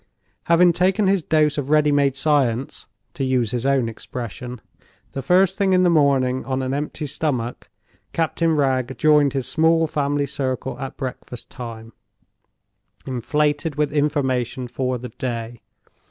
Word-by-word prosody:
Having 170 +1 +5
taken 190 +4 +2
his 195 -1 +2
dose 150 -1 +2
of 140 -1 -4
ready 150 -1 +4
made 140 -2 +2
science 135 -4 0 0.3
(to 135 - -3
use 125 -4 +1
his 125 +1 -1
own 135 -4 +2
expression) 120 +2 -7 0.5
the 135 - -4
first 185 - +3
thing 195 -2 +3
in 185 0 +4
the 175 - +4
morning 135 -4 +2
on 130 0 -2
an 130 +1 -2
empty 150 +1 -3
stomach, 130 -5 -3 0.4
Captain 165 0 0
Wragge 130 -3 0
joined 150 -3 +4
his 135 -3 -2
small 165 0 +3
family 145 -2 -1
circle 130 -2 -3
at 135 - -6
breakfast 125 -2 -7
time, 115 -2 -8 1.1
inflated 145 +4 -1
with 150 -1 0
information 130 -4 0
for 130 +1 -2
the 125 +1 -8
day. 120 -2 -5
140 Hz, 145 wpm, -22 LUFS, 125-155 Hz, 1.1 s, Having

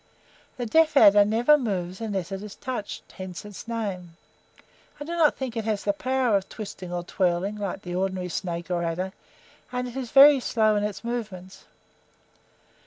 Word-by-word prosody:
The 245 - -3
deaf 315 +5 +3
adder 205 -3 +8
never 235 +8 +4
moves 185 -5 -3
unless 195 -5 -3
it 195 0 -4
is 210 -1 -9
touched, 250 -5 -6
hence 185 0 -8
its 205 +2 -10
name. 190 -7 -4 0.8
I - - -5
do 320 - -7
not 330 -3 +3
think 260 -3 -4
it 225 -2 -3
has 215 -2 -1
the 200 - +1
power 255 0 +1
of 195 -1 -1
twisting 195 -4 -8
or 175 0 -3
twirling, 185 +3 -1
like 200 -1 -4
the 175 - -6
ordinary 185 0 -2
snake 175 0 -4
or 175 -1 0
adder 175 +3 -2 0.6
and 250 0 -2
it 245 - -9
is 260 -3 -4
very 280 +2 +8
slow 220 -3 +2
in 205 - 0
its 210 +1 -4
movements. 210 -6 -6
205 Hz, 175 wpm, -25 LUFS, 185-240 Hz, 0.8 s, adder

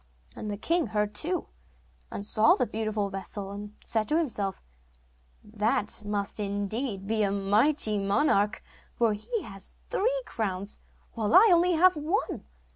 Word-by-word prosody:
And 210 - -6
the 205 - -3
king 335 - +1
heard 210 -1 -1
too, 350 - +3 0.6
and 200 - -6
saw 215 +1 +4
the 250 - 0
beautiful 215 -3 -2
vessel, 195 +1 -4
and 205 +1 -8
said 220 -2 0
to 305 - +3
himself: 210 - -2 0.8
'That 215 0 -1
must 205 0 -2
indeed 205 +1 -3
be 220 +1 0
a 200 - +2
mighty 210 +3 +2
monarch, 200 -1 +1 0.3
for 230 -2 +2
he 410 - -4
has 195 -1 -8 0.2
three - - 0
crowns 200 -2 -4 0.3
while 220 -2 0
I 385 +4 +9 0.3
have 365 +2 +5
only 300 +1 -6
one. 450 - -3
210 Hz, 145 wpm, -28 LUFS, 200-260 Hz, 0.8 s, I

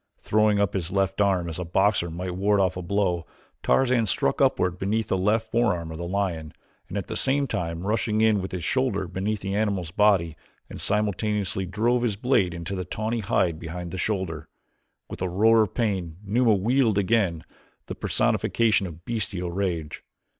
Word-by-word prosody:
Throwing 105 -1 +2
up 100 -2 +1
his 90 -3 -2
left 95 0 0
arm 95 -4 +2
as 85 +1 -5
a - - -2
boxer 90 +1 +1
might 90 +2 -4
ward 100 +2 +2
off 95 -3 +2
a 90 - -4
blow, 90 -2 -1 0.3
Tarzan 125 -4 +2
struck - - 0
upward 90 0 +2
beneath 110 +3 -1
the - - +2
left 110 +4 0
forearm 90 -9 +1
of 80 - -7
the 85 - -4
lion, 85 -5 -2 0.4
at 100 0 -3
the - - -6
same 140 +1 +1
time 85 -7 -3
rushing 110 0 0
in 110 -2 +3
with 95 - -5
his 90 -3 -4
shoulder 110 - 0
beneath 100 +4 -2
the 95 0 -3
animal's 100 -6 -1
body 95 -5 +3 0.4
and - - -7
simultaneously 105 -2 0
drove 115 +6 +1
his 115 -4 0
blade 100 -6 +1
into 85 +3 -5
the 95 - -3
tawny 110 +6 -3
hide 95 -6 0
behind 85 +1 -6
the 95 - -5
shoulder. 90 -7 -2 0.6
With - - -8
a 90 - 0
roar 110 +5 +4
of 105 - -1
pain 95 -8 -1
Numa 110 +2 +3
wheeled 115 +2 +2
again, 95 -5 +1 0.4
the - - -5
personification 110 -4 +1
of 85 0 -11
bestial 100 -6 -2
rage. 85 -5 -3
100 Hz, 180 wpm, -25 LUFS, 90-110 Hz, 0.6 s, roar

